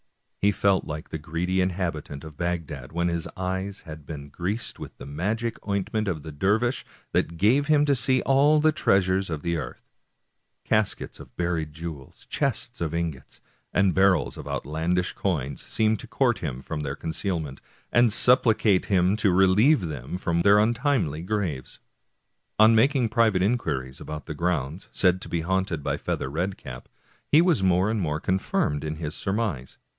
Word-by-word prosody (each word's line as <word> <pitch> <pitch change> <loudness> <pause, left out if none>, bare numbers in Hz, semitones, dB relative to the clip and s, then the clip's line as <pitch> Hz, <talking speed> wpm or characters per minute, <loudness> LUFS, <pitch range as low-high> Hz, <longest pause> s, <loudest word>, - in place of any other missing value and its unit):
He 100 - +3
felt 100 -1 +2
like 75 +1 -6
the 80 - -5
greedy 90 +4 -1
inhabitant 85 -6 -3
of 80 -2 -10
Bagdad 80 -5 -4
when 85 +2 0
his 85 -1 -2
eyes 95 +1 -3
had 75 -2 -11
been 70 -2 -7
greased 95 +10 -4
with - - -9
the - - -9
magic 105 +11 -2
ointment 100 +2 -1
of 80 -6 -2
the 80 - -7
dervish, 105 - +1 0.3
that 85 - 0
gave 125 - +3
him 150 -1 +4
to 145 -1 +3
see 130 +1 +2
all 145 +3 +4
the 155 +1 +4
treasures 95 - +2
of 75 -3 -4
the 85 -1 0
earth,^ 80 - -7 0.8
Caskets 105 -2 0
of - - -14
buried 85 -3 -1
jewels, 80 -4 -8
chests - - -1
of 85 -1 -2
ingots, 85 -5 -4 0.3
and 95 -2 +3
barrels 95 -1 +3
of - - -8
outlandish 85 +5 -1
coins 70 -8 -2
seemed 110 -1 0
to - - -9
court 120 -4 +1
him 65 -5 -5
from 80 - -4
their 70 -2 -3
concealments, 80 -4 -3 0.3
and 120 -1 +4
supplicate 110 -5 +4
him 95 0 +2
to 105 -2 +3
relieve 95 - +5
them 75 -2 -5
from 85 -2 0
their 100 +3 +6
untimely 115 - +1
graves. 90 -9 -3 0.8
On 110 +1 +7
making 125 +1 +3
private 110 -5 +3
inquiries 75 - -1
about 75 -1 -7
the 80 - -5
grounds 85 0 -2
said 95 -1 +2
to - - -7
be 85 - -1
haunted 95 -2 -1
by - - -1
Feather 65 - -3
Red 90 +6 -2
cap, 60 0 -10 0.4
he 155 +3 +5
was 175 - +2
more 95 +2 +3
and 110 -2 -1
more 75 -3 -1
confirmed 85 -5 0
in 75 0 -3
his 80 -1 -4
surmise. 95 - -3
90 Hz, 170 wpm, -25 LUFS, 80-105 Hz, 0.8 s, On